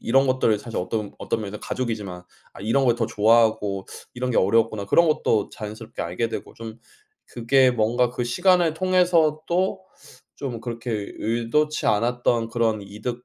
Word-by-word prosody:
이런 135 +3 +3
것들을 130 -5 +2
사실 115 +2 -6
어떤 100 +3 -3
어떤 - - -2
면에서는 105 0 -6
가족이지만 105 -8 -4 0.3
'아 - - -11
이런 115 +7 +1
걸 120 - +3
더 115 -2 0
좋아하고 110 -3 +2 0.3
이런 125 0 -2
게 - - 0
어려웠구나.' 110 0 +2
그런 170 +10 +4
것도 115 -9 +1
자연스럽게 110 +1 -7
알게 90 +7 -2
되고 - - -6
좀 115 -1 -9 0.5
그게 130 +2 +3
뭔가 120 +1 +1
그 120 0 -3
시간을 175 +5 +2
통해서 175 -4 +2
또 190 +2 0 0.6
좀 125 -5 -5
그렇게 120 0 -5 0.3
의도치 120 +7 0
않았던 115 +1 +1
그런 115 -2 0
이득, 110 +5 -6
115 Hz, 350 characters per minute, -23 LUFS, 110-130 Hz, 0.6 s, 그런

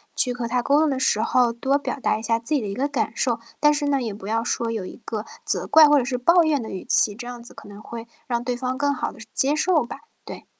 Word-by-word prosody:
去 250 - +1
和 240 -1 -4
他 245 +1 0
沟 285 +2 +3
通 315 -1 +3
的 265 -1 -1
时 215 -4 +2
候， 240 +1 +2
多 265 +4 +1
表 285 - -4
达 - - +1
一 220 - -8
下 230 +1 +1
自 265 +7 -2
己 275 - +1
的 210 - -4
一 200 - -4
个 275 +5 -1
感 280 -6 -1
受。 240 -2 0 0.2
但 295 0 +5
是 295 0 -1
呢， 275 -2 +1
也 230 - -3
不 200 -1 -11
要 225 +1 0
说 230 -1 -1
有 220 -4 -3
一 - - -10
个 215 -1 -4 0.2
责 - - -1
怪 315 -1 +8
或 295 - +5
者 245 - -1
是 250 -1 -2
抱 340 +8 +5
怨 305 -3 +1
的 220 - -7
语 190 - -6
气， 210 - +3
这 240 +1 -8
样 245 -1 -7
子 - - -14
可 - - -13
能 205 0 -11
会 230 0 -8 0.2
让 240 -2 -1
对 245 0 -2
方 255 0 -2
更 285 +1 +1
好 - - -3
地 - - -16
是 220 - -11
接 285 +1 +2
受 315 -1 +2
吧。 275 - -8 0.3
对。 - - -9
245 Hz, 325 characters per minute, -23 LUFS, 230-285 Hz, 0.3 s, 怪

